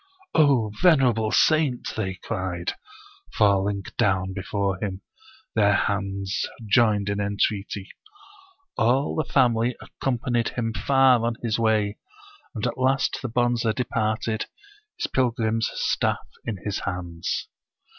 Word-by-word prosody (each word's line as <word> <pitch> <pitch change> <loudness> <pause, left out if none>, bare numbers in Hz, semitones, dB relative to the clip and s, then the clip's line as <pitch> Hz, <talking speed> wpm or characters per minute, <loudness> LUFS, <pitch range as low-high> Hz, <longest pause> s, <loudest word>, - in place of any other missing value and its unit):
"Oh, 135 -9 +4
venerable 125 - +4
saint!" 155 -3 +2
they 95 -4 -2
cried, 90 -2 -3 0.6
falling 100 -1 +2 0.2
down 95 -1 +1
before 100 0 -2
him, 95 -1 -3 0.5
their 105 -2 +4
hands 100 -1 -1 0.2
joined 105 -2 +3
in 100 0 -1
entreaty. 100 -1 -1 0.9
All 130 +5 +2
the 155 - -2
family 120 -2 +3
accom 130 -2 -3
panied 120 -1 -1
him 115 -2 -1
far 135 -2 +4
on 115 0 0
his 115 -1 0
way, 110 -2 +1 0.6
and 105 - -2
at - - -2
last 130 +1 +1
the 130 - -3
Bonze 120 0 +1
departed, 110 -2 -1 0.5
his 345 - -1
pilgrim's 115 - 0
staff - - 0 0.2
in 110 -4 -3
his 105 -2 -1
hands. 85 -3 -3
110 Hz, 120 wpm, -25 LUFS, 100-120 Hz, 0.9 s, Oh